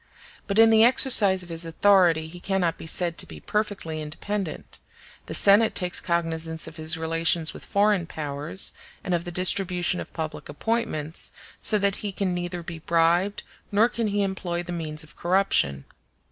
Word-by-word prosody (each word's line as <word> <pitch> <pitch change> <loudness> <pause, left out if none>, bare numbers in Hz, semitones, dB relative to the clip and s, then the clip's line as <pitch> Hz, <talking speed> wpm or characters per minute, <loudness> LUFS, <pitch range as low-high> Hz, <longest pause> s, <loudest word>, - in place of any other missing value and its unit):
But 200 -1 -2
in 225 0 +7
the 220 0 +6
exercise 215 -6 +5
of 175 - -13
his 165 0 -3
authority 165 -1 +3
he 175 +2 -11
cannot 180 -3 -1
be - - -8
said 170 0 +1
to - - -1
be - - -10
perfectly 200 -7 -3
independent; 180 +4 -5 0.5
the - - -1
Senate 210 +2 +4
takes 180 -2 +1
cognizance 165 -2 -1
of 160 0 -11
his 160 +2 0
relations 165 0 0
with - - -10
foreign 200 -4 +1
powers, 150 +4 -1 0.3
and 185 - -2
of 170 0 -1
the 175 - -5
distribution 180 0 +2
of - - -8
public 160 -1 -6
appointments, 160 -6 -3 0.3
so 215 - +2
that 200 -1 0
he 205 - -4
can 190 -1 -2
neither 175 0 -4
be 165 0 -7
bribed 170 +4 +1 0.3
nor 210 +3 +4
can 235 -2 -3
he 205 0 0
employ 180 -3 -3
the 175 - -8
means 160 -3 -4
of 150 -1 -17
corruption. 175 - +1
175 Hz, 175 wpm, -25 LUFS, 165-200 Hz, 0.5 s, in